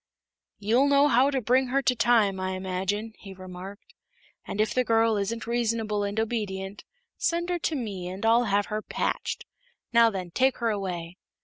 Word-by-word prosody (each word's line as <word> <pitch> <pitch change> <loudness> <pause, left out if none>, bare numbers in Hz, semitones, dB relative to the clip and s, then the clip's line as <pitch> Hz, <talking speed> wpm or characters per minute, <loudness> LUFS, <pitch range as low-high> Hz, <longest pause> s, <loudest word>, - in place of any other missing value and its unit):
"You'll 230 +7 +2
know 285 0 +5
how 255 +3 +4
to 275 -2 0
bring 255 +3 +2
her 275 +2 0
to 250 - +2
time, 220 -5 +3
I 185 0 -2
imagine," 190 +4 -3
he 195 -2 -10
remarked, 185 +2 -10 0.5
"and 200 - -5
if 215 - +2
the 255 - +2
girl 225 -1 +3
isn't 210 +3 -2
reasonable 225 -3 0
and 205 +2 -2
obedient, 205 -3 -3 0.4
send 345 +1 0
her 350 - 0
to 320 - -1
me 200 -9 -4
and 190 +4 -5
I'll 230 +2 +4
have 205 -1 +1
her 215 0 -3
patched. - - -3 0.5
Now, 230 -1 +6
then, 185 -4 -5
take 260 +6 +2
her 230 -2 0
away." 180 -4 -4
215 Hz, 180 wpm, -27 LUFS, 195-240 Hz, 0.5 s, Now